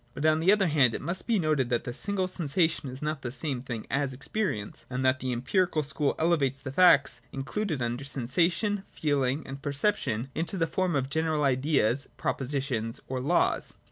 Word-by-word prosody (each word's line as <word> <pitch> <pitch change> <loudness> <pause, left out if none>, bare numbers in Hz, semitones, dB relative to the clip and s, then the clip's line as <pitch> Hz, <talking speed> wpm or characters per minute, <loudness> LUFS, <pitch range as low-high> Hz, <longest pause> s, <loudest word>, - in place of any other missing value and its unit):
But, 145 - -3
on 155 0 +4
the 175 +4 +5
other 205 -2 +4
hand, 140 -8 +3
it - - -4
must 175 +2 -3
be 230 -2 +3
noted 155 -8 +1
that 120 -2 0
the 125 - -5
single 195 - 0
sensation 165 -4 0
is 130 +3 -8
not 155 -1 -2
the 120 - -4
same 130 -1 -2
thing 120 -4 -5
as 140 -1 0
experience, 135 - -3
and 130 0 -2
that 130 +1 +3
the 130 - -2
Empirical 155 +6 +1
School 145 0 0
elevates 155 -5 +2
the 135 - -6
facts 140 -7 +5
included 150 - -2
under 120 +3 -2
sensation, 170 - 0
feeling, 140 -1 0
and 135 +1 -8
perception 140 - -1
into 170 +5 -2
the 165 - +2
form 185 -1 -1
of 135 -1 -1
general 160 -1 +1
ideas, 135 -1 +2
propositions 130 -4 -2
or 130 -1 -3
laws. 155 +7 +1
140 Hz, 185 wpm, -28 LUFS, 130-165 Hz, -, the